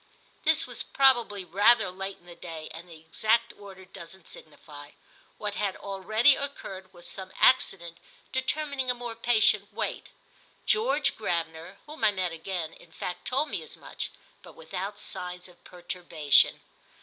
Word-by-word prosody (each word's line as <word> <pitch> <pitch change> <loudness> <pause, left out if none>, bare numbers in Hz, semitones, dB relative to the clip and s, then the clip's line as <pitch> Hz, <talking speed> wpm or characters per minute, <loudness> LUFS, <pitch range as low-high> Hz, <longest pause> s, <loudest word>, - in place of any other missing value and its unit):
This 315 +1 +5
was - - -1
probably 240 -8 +3
rather 205 +3 +4
late 195 +1 -5
in 175 - -26
the 175 - -11
day, 165 -2 -8
and 170 +2 -10
the 165 -2 -11
exact 215 +8 +1
order 195 -2 -12
doesn't 175 -1 -10
signify. 145 -1 -11 0.4
What 210 -1 -3
had 205 -2 -1
already 215 +7 +3
occurred 190 -9 -6
was 175 -2 -7
some 190 -1 -5
accident 170 -9 +3 0.3
determining 270 0 -1
a 250 - +2
more 240 -1 -5
patient 215 -3 +3
wait. - - -3 0.6
George 435 - +2
Gravener, 170 -2 -3
whom 305 +1 -9
I - - +7
met 185 -3 -1
again, 165 0 -4
in 165 - -17
fact 180 +2 -5
told 270 +4 +1
me - - -2
as - - -8
much, - - -5 0.3
but - - -14
without 205 - -5
signs 180 -2 -6
of 180 -1 -20
perturbation. 175 -4 +2
195 Hz, 150 wpm, -28 LUFS, 175-235 Hz, 0.6 s, I